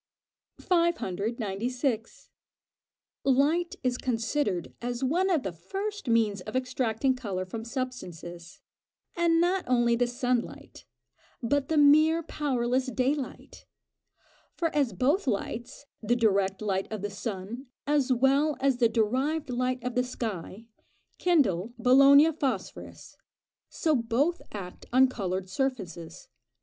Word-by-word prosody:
596. 235 - -1 0.9
Light 295 +6 +2
is 250 -1 0
considered 225 - -1
as 245 +1 -3
one 350 +9 +1
of 330 -7 +1
the 190 - -3
first 390 - -5
means 220 -4 +2
of 215 +6 -8
extracting 255 0 0
colour 200 -7 -4
from 220 +4 -6
substances, 195 - -6 0.5
and 340 -2 +3
not 360 +2 +2
only 240 -2 +3
the 245 +1 +1
sun 245 0 0
light, - - -12 0.6
but 275 +4 0
the 320 - +1
mere 310 +3 +5
powerless 260 -4 -1
day 255 +2 +1
light: 280 -4 -8 0.9
for 330 -3 -1
as 280 -5 +2
both 280 - +1
lights 235 +4 -3 0.2
the 230 +2 +1
direct 200 -4 +1
light 195 -1 -1
of 215 -2 -5
the 205 - -3
sun, 205 +5 -6 0.2
as 285 -3 +1
well 275 +4 +3
as 270 -2 +2
the 235 -2 +3
derived 255 +7 0
light 250 0 -1
of 250 0 -3
the 250 +1 +2
sky 225 -4 -5 0.5
kindle 240 - +2
Bologna 275 +5 +6
phosphorus, 265 - -5 0.5
so 315 -3 +1
both 260 +9 0
act 185 -4 -8
on 260 +2 +6
coloured 190 -5 -3
surfaces. 185 - -4
250 Hz, 125 wpm, -28 LUFS, 215-285 Hz, 0.9 s, Bologna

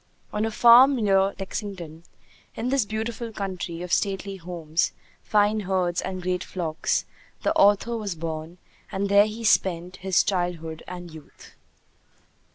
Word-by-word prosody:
On 210 +1 0
a - - 0
farm 240 +5 +7
near 195 -4 +2
Lexington, 185 -5 -6 0.5
in 240 - -2
this 270 -4 +2
beautiful 225 +2 -4
country 185 -4 -5
of 180 - -4
stately 195 -1 -1
homes, 170 -2 -2 0.3
fine 210 0 +2
herds, 185 -3 0
and 185 -1 -5
great 180 0 -1
flocks, 165 -4 -2 0.4
the - - +2
author 205 +4 +4
was 205 -5 -3
born, 160 +1 -5 0.3
and 195 +1 -2
there 200 +1 +6
he 220 +2 -7
spent 180 -3 +1
his 190 -1 +2
childhood 175 -4 -2
and 175 -2 -8
youth. 155 -2 -14
190 Hz, 140 wpm, -25 LUFS, 175-210 Hz, 0.5 s, farm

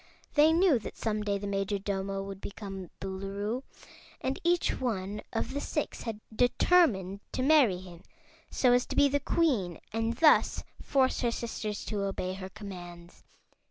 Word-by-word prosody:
They 305 +2 +6
knew 330 -5 +4
that - - -8
some 215 -1 -1
day 205 -1 0
the 200 - -6
Majordomo 195 0 -2
would 195 0 -8
become 195 -3 -7
Boolooroo, 195 +5 -3 0.6
and 265 +1 -2
each 345 0 +2
one 210 -4 -2
of 230 +2 -2
the 285 - -2
six 300 - -3
had 225 -3 -4 0.2
determined 240 - +3
to 255 - -1
marry 270 -10 +5
him 180 -2 -11 0.5
so 250 -2 +3
as 245 0 +2
to - - -5
be 285 - +6
the 285 +1 +1
Queen 250 - +1
and 225 +1 0
thus 310 +4 +4 0.2
force 265 -2 +2
her 240 - +2
sisters 225 -3 -4
to 210 -2 -2
obey 190 -2 -2
her 190 0 -7
commands. 175 -4 -10
210 Hz, 160 wpm, -30 LUFS, 195-260 Hz, 0.6 s, They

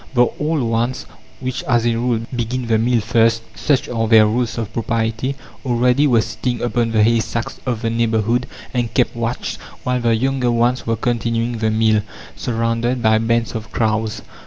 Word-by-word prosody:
The 125 0 +6
old 150 -2 0
ones, 115 +2 -1 0.3
which, 130 +2 -3
as 120 -5 +2
a 120 - +2
rule, 115 0 0
begin 120 +1 -2
the 115 -1 +2
meal 120 0 +2
first 115 0 +2
such 145 -3 0
are 115 -2 -1
their 110 -1 +7
rules 115 +2 -1
of 110 -2 -4
propriety 115 +3 -1 0.3
already 125 +3 +3
were 120 -4 +4
sitting 120 +3 -3
upon 120 -1 0
the 110 -1 +3
haystacks 115 +1 0
of 120 -2 -2
the 115 - 0
neighbourhood 115 +1 +1 0.3
and 120 -3 -1
kept 125 -3 +2
watch, 115 +1 -3 0.3
while 125 0 0
the 115 -1 +3
younger 130 +1 0
ones 120 +1 +1
were 115 - +1
continuing 115 0 -1
the 110 0 +1
meal, 110 -1 +3 0.3
surrounded 115 +1 -1
by 110 0 +4
bands 115 +1 0
of 110 -2 -6
crows. 110 -1 -1
115 Hz, 175 wpm, -19 LUFS, 115-125 Hz, 0.3 s, their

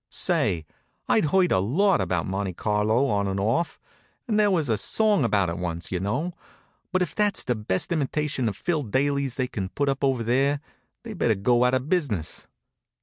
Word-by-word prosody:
Say, 80 -3 0 0.4
I'd - - +3
heard 180 +4 +3
a - - +4
lot 175 - +2
about 90 -3 -1
Monte 95 0 -3
Carlo 105 +6 +1
on 100 -6 0
and 95 0 -2
off 115 +12 0 0.5
there 210 -4 +2
was 165 -7 +1
a 115 - +2
song 210 - +2
about 105 -5 +2
it 85 +2 -4
once, 85 -2 -4
you 90 - -1
know 145 - -2 0.6
but 185 0 +2
if - - -5
that's 210 -1 +1
the 125 - 0
best 105 - -2
imitation 150 -5 0
of 100 - -7
Phil 165 +1 -1
Daly's 140 +2 0
they 130 - 0
can 100 -6 -4
put 140 +6 -1
up 135 +1 -2
over 130 -4 +1
there, 135 +5 +1 0.4
they'd 220 -5 -8
better 110 - +3
go 120 +5 +2
out 125 +1 +3
of 130 +2 -2
business. 140 - -1
125 Hz, 190 wpm, -25 LUFS, 100-155 Hz, 0.6 s, a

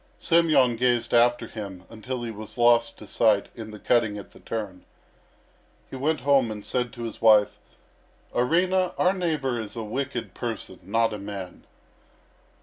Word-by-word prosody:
Semyon 155 -8 +3
gazed 120 -1 +1
after 120 +1 +4
him 100 -4 -8
until 120 +3 -6
he 115 - -4
was 110 +1 -9
lost 120 -1 +4
to - - -11
sight 105 -3 +2
in 110 -2 -8
the 105 - -9
cutting 110 -1 +1
at 100 - -10
the - - -16
turn. 105 -5 -5 1.1
He - - -6
went 150 +3 0
home 135 -3 +3
and 105 -1 -7
said 125 -2 -1
to 120 - -7
his 115 - -6
wife: 105 -2 +5 0.7
"Arina, 180 +8 +1
our 180 +1 +3
neighbour 155 -9 -1
is 110 0 -7
a 115 - -4
wicked 120 -3 -4
person, 115 -6 -5
not 115 +4 +1
a 105 - -5
man." 100 -3 -8
115 Hz, 160 wpm, -25 LUFS, 105-130 Hz, 1.1 s, wife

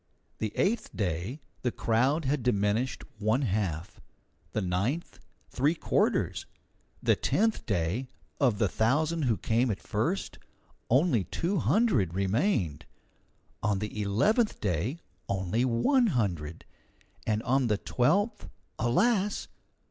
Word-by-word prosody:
The 110 -2 -2
eighth 215 +3 +1
day 100 - -2 0.2
the 125 - 0
crowd 130 +9 +1
had 135 +1 +1
diminished 115 +2 0 0.2
one 110 +6 +1
half; 95 - -2 0.5
the - - -1
ninth, 100 - -2 0.3
three 145 +6 +2
quarters; - - 0 0.6
the - - +4
tenth 225 +1 0
day, 100 +6 -1 0.3
of 125 -7 +3
the 105 - +2
thousand 150 - +1
who 115 -4 +2
came 120 +3 +1
at 105 - -2
first, - - -2 0.5
only 130 - +3
two 175 - -1
hundred 130 - +2
remained; 100 - 0 0.7
on 105 -1 +1
the 105 +1 -4
eleventh 200 - +2
day 100 - -1 0.3
only 95 +4 0
one 130 - +3
hundred; 85 - -2 0.6
and 110 0 0
on 130 0 +2
the 105 -2 +2
twelfth 175 - 0 0.3
alas! 200 - +1
115 Hz, 120 wpm, -29 LUFS, 100-150 Hz, 0.7 s, the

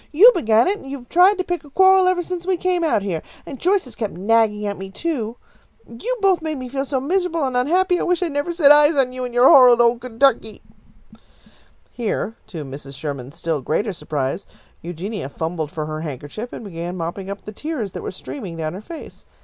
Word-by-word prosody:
"You 410 +11 +8
began 225 - +3
it, 405 +2 0
and 270 - -11
you 280 - -4
have 245 -2 -16
tried 370 +4 +5
to 370 - -1
pick 355 -2 -3
a 290 - -15
quarrel 380 +4 +5
ever 365 -1 +1
since 360 0 -5
we 375 -1 +1
came 360 -1 0
out 260 -11 +1
here, 175 -6 -2 0.2
and 275 -4 -8
Joyce 380 +2 +2
has 250 - -10
kept 215 -5 -4
nagging 210 +2 +2
at 200 -1 -3
me, 195 0 -7
too. 240 - -3 0.5
You've 455 - -5
both 380 -4 +3
made 315 -2 -3
me 255 -1 -6
feel 270 +1 -2
so 270 -1 -1
miserable 335 +2 0
and 260 -1 -3
unhappy 355 +8 +2
that - - -3
I - - -1
wish 360 0 +1
I'd 340 - -2
never 285 +4 -2
set 325 -4 +5
eyes 295 +1 +6
on 260 -2 +1
you 255 0 -4
and 245 - -6
your 245 +2 +5
horrid 250 -3 +8
old 235 0 +3
Kentucky!" 250 -2 0 1.3
Here, 225 -1 -3
to 165 -8 -7
Mrs. 140 0 -9
Sherman's 140 -1 -6
still 165 -3 -2
greater 200 - -1
surprise, 145 -1 -3 0.3
Eugenia 175 0 -5
fumbled 160 0 -4
for 155 0 -4
her 155 0 -5
handkerchief 150 - -7
and - - -8
began 175 -1 -6
mopping 175 +3 -5
up 200 0 -7
the 210 - -6
tears 245 - -4
that - - -7
were - - -4
streaming 190 - -7
down 155 0 -3
her 190 - -7
face. 320 +8 -10
245 Hz, 220 wpm, -21 LUFS, -, 1.3 s, You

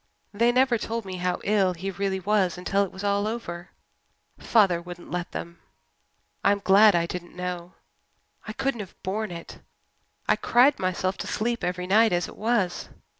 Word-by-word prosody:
"They 235 +4 +3
never 250 -1 +3
told 230 0 -4
me 185 -1 -5
how 180 0 -1
ill 200 -3 +2
he 190 +3 -4
really 190 0 -2
was 190 -2 +1
until 195 +2 +1
it 195 - -5
was 190 - -9
all 200 +1 +1
over 180 -7 -5 0.7
father 195 -7 +3
wouldn't 175 0 -10
let 175 -1 -3
them. 170 0 -7 0.8
I'm 200 - +4
glad 200 +1 +6
I 170 -1 +2
didn't 175 0 -7
know 180 -1 -5 0.7
I 215 - -4
couldn't 270 0 -2
have 195 -3 -8
borne 210 +3 -2
it. 170 -1 -9 0.7
I - - +3
cried 265 +4 +4
myself 185 +1 -1
to - - -4
sleep 235 +2 -2
every 180 0 -2
night 215 +2 +4
as 175 0 0
it - - -11
was. 210 -5 -1
195 Hz, 175 wpm, -26 LUFS, 180-215 Hz, 0.8 s, glad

